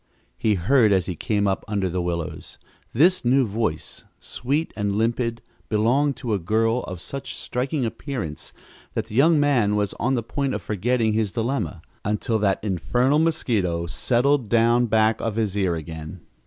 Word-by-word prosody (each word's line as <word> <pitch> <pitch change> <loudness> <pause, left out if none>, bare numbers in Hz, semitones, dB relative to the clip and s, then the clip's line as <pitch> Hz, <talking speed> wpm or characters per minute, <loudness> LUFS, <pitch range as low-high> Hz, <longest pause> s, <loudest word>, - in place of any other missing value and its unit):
he 110 -2 +1
heard 110 +4 +3
as 95 -3 +3
he 90 - -4
came 100 +4 0
up 95 - -1
under 100 -3 0
the 90 0 -2
willows. 85 -2 -4 0.3
This 175 +9 +3
new 130 +2 +3
voice, 105 -7 -3 0.2
sweet 145 +6 -2
and 100 -1 -1
limpid, 115 +2 -1 0.3
belonged 125 +6 +2
to 120 -4 -3
a 100 - +1
girl 115 +6 +1
of 90 -1 -6
such 135 +9 -6
striking 130 +2 -2
appearance 115 - -5 0.4
that - - -1
the 105 - -9
young 155 +4 +5
man 125 -8 +3
was 105 -1 0
on 130 +3 +1
the 120 - -1
point 140 +3 -2
of - - -4
forgetting 110 +2 0
his 110 -2 0
dilemma 115 - -2 0.2
until 110 +2 0
that 100 -1 +1
infernal 120 - +1
mosquito 110 - 0
settled 125 +6 +1
down 120 +1 +3
back 110 0 +2
of 115 -2 -2
his 110 -3 -1
ear 95 -4 +1
again! 80 +2 -7
110 Hz, 170 wpm, -23 LUFS, 100-125 Hz, 0.4 s, young